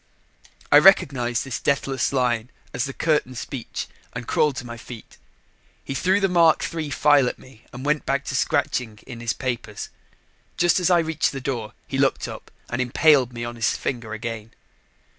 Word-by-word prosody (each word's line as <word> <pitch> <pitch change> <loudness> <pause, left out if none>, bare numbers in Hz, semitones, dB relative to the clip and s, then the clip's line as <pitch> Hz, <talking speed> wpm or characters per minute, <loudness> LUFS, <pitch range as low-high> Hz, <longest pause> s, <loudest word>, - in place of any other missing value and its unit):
I 145 - +9
recognized 125 -10 +4
this 135 -3 -4
deathless 135 -2 0
line 125 -3 0 0.2
as 125 - -1
the 135 - -4
curtain 150 -5 0
speech 115 +2 -5 0.3
and 125 -1 -6
crawled 150 -3 +2
to 125 - -6
my 120 -1 -7
feet. 115 -1 -11 0.7
He - - -4
threw 185 +8 +2
the 195 - +2
Mark 170 -3 +4
III 160 -3 -3
file 145 -2 +4
at - - -8
me 130 -3 -18
and 125 +2 -8
went 150 0 +1
back 140 +1 -1
to 130 - -3
scratching 120 -3 0
in 120 -3 -9
his 115 -2 -1
papers. 120 -5 -4 0.7
Just 175 +1 +3
as 180 - +2
I 175 - +5
reached 160 -3 0
the 135 - -4
door, 120 -6 -4
he - - -3
looked - - +1
up - - -9 0.2
and 120 +1 -2
impaled 130 0 +4
me 120 -1 -5
on 120 0 -6
his 115 -1 0
finger 120 -4 -4
again. 115 0 -6
130 Hz, 180 wpm, -23 LUFS, 120-150 Hz, 0.7 s, I